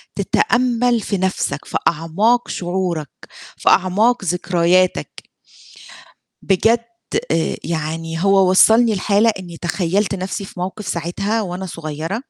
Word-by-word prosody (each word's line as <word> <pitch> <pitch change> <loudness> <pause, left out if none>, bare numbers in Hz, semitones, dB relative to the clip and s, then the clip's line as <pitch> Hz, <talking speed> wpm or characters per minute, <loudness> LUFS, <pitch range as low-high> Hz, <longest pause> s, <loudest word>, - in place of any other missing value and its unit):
تتأمَّل 245 - +1
في 200 - -2
نَفْسك، 185 -6 -2
في - - -2
أعماق 190 +10 +1
شعورك 175 -4 -3 0.5
في - - +1
أعماق 205 +5 +2
ذكرياتك. 180 +1 0 1.1
بجد 225 +5 +2 0.5
آآ، 165 0 0
يعني 165 +1 -3
هو 195 -1 +4
وصّلني 220 +4 +5
لحالة 205 +3 +2
إني 175 -3 -9
تخيّلت 185 +4 -1
نَفْسي 190 +1 -4
في 185 - -10
موقف 190 +3 -5
ساعتها 195 +6 -2
وأنا 185 0 -5
صغيرة 165 - -5
185 Hz, 110 wpm, -19 LUFS, 170-210 Hz, 1.1 s, وصّلني